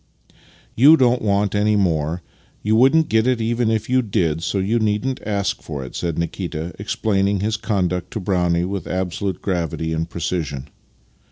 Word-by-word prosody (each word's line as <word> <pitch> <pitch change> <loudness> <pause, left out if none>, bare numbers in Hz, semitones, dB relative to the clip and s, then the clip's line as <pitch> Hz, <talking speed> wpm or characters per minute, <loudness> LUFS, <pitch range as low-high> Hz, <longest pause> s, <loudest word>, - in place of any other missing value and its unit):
" - - -28 0.3
You 145 +7 +7
don't 125 -2 +3
want 100 -1 +1
any 105 +1 +2
more. 85 -3 0 0.4
You 110 +1 +2
wouldn't 135 +7 +5
get 110 +2 +2
it 130 -2 +2
even 115 0 0
if 110 -1 0
you 130 0 +3
did, 90 -8 0
so 95 - -1
you 100 +5 +1
needn't 110 +5 0
ask 100 -2 -1
for 70 -4 -6
it," 65 - -10
said 85 -3 -2
Nikita, 85 -1 -4
explaining 100 -1 0
his 110 +1 0
conduct 90 -5 -1
to - - -2
Brownie 90 -3 +1
with 95 0 -4
ab 90 -1 -2
solute 95 +1 -3
gravity 80 -3 -2
and 80 0 -2
precision. 75 -5 -3
100 Hz, 175 wpm, -21 LUFS, 85-110 Hz, 0.4 s, You